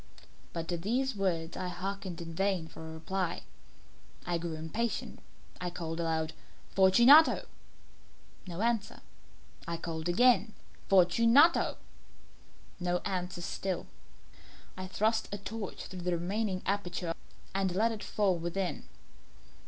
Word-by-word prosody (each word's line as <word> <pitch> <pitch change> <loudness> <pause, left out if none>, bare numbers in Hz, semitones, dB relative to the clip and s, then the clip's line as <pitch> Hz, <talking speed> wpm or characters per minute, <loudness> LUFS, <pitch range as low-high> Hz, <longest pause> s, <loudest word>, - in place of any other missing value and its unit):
But 165 -1 -4
to 175 - 0
these 245 +8 0
words 175 -4 -1
I 185 - -3
hearkened 185 0 -4
in 165 -1 -7
vain 190 -2 0
for 160 0 -9
a - - -7
reply. 180 +2 -3 0.8
I 175 -1 0
grew 165 -1 -4
impatient. 210 +9 -3 0.4
I 180 - -1
called 165 -1 -5
aloud 160 -1 -1 0.4
"Fortunato!" 240 +11 +7 1.0
No 175 +2 -5
answer. 230 -3 -1 0.7
I 170 0 -2
called 165 0 -4
again 220 +1 +4 0.4
"Fortunato 230 - +5 0.5
" - - -28
No 175 0 +2
answer 180 -2 -3
still. 185 +2 -3 0.9
I 185 0 -6
thrust 220 +3 +1
a 205 - -2
torch 205 0 -6
through 185 -1 -7
the 175 -1 0
remaining 190 +2 -2
aperture 180 -4 -1 0.4
and 190 -1 +1
let 225 +4 +3
it 220 -2 -5
fall 200 -3 +1
within. 175 +2 -3
185 Hz, 125 wpm, -31 LUFS, 170-205 Hz, 1.0 s, Fortunato